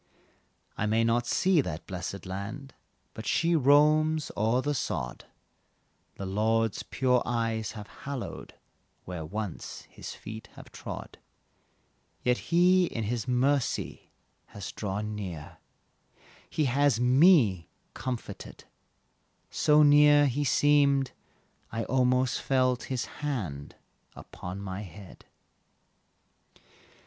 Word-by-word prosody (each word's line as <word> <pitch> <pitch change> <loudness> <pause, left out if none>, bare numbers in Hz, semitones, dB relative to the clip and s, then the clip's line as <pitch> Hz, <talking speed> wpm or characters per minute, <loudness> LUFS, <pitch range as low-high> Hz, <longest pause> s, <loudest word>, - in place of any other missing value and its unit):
I 105 - +1
may 110 +2 +2
not 120 +1 +1
see 185 +1 +3
that 80 - -6
blessed 95 +2 -6
land, 105 +9 -6 0.4
But 110 0 -8
she 170 +1 +2
roams 150 +2 +4
o'er 110 +4 +2
the 145 - 0
sod - - -3 0.9
The 100 - -6
Lord's 110 +2 +1
pure 125 -2 +1
eyes 115 -3 -2
have 105 -2 -8
hallowed, 140 +3 -7 0.5
Where 90 -3 -5
once 100 +3 -6
His - - -8
feet 110 +1 -9
have - - -13
trod. - - -8 1.0
Yet 125 0 +2
He 180 +2 +5
in 115 -7 -4 0.2
mercy 130 +2 0 0.4
has 100 -2 -7
drawn 105 +1 -4
near, 90 -8 -7 0.9
He 155 - 0
has 135 -1 +2
me 125 - +4 0.2
comforted 125 -2 -6 0.9
So 150 0 +4
near 145 0 +6
He 140 +2 0
seemed 140 -1 +3 0.6
I 115 - -2
almost 125 +1 +1
felt 130 -2 +1
His 130 -2 -2 0.2
hand 95 - -4 0.4
upon 90 +3 -8
my 95 0 -5
head. 95 0 -12
120 Hz, 105 wpm, -28 LUFS, 105-145 Hz, 1.0 s, near